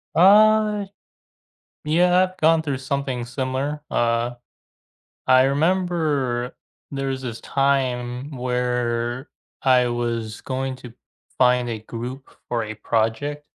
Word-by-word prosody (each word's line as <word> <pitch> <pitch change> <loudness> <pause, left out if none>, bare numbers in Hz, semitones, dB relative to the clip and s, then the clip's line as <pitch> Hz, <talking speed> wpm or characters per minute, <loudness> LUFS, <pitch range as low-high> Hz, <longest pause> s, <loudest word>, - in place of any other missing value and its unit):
Uh, 210 +2 +5 1.0
yeah, 180 +4 +4
I've 185 0 -4
gone 160 +1 +4
through 145 -4 -2
something 135 -2 -3
similar. 135 +4 -3
Uh, 120 +1 +1 1.0
I 130 0 +6
remember 145 -5 0 0.4
there 135 -1 -3
was 130 -1 -3
this 120 -3 -6
time 130 -1 -1
where 125 0 -2 0.3
I 125 -2 +4
was 115 -2 -3
going 130 0 -3
to 125 -2 -11 0.4
find 125 -1 +3
a 115 -2 -3
group 120 +5 -7 0.2
for 120 -1 -1
a 110 0 -6
project, 115 +7 -1
130 Hz, 110 wpm, -22 LUFS, 120-145 Hz, 1.0 s, I